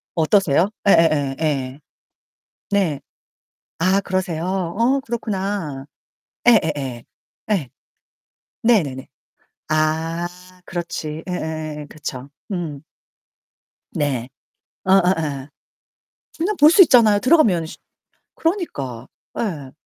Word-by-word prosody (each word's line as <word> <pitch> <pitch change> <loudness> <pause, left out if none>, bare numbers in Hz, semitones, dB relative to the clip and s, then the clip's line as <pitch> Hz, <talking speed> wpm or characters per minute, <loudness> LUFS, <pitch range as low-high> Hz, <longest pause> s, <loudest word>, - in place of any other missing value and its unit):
어떠세요? 170 +1 +3 0.2
예예예 155 -6 +4
예. 140 -3 -1 0.9
네. 185 -8 +1 0.8
아 185 +4 +3
그러세요? 180 -4 -2
어 195 +8 +1
그렇구나. 195 - -3 0.6
예예예. 145 - +2 0.5
예. 175 -11 0 0.9
네네네. 160 - +1 0.6
아 160 +2 0 0.4
그렇지. 160 -3 -5
예예예예. 155 -3 -4
그쵸. 145 -3 -7 0.2
음. 160 -6 -4 1.1
네. 135 -5 -1 0.6
어어어. 165 -8 +2 0.9
그냥 370 +6 0
볼 300 +2 +8
수 385 - +7
있잖아요, 225 - +5
들어가면 225 - +4
씨 160 - -10 0.6
그러니까 140 - -3 0.3
예. 155 - -3
165 Hz, 180 characters per minute, -21 LUFS, 145-200 Hz, 1.1 s, 볼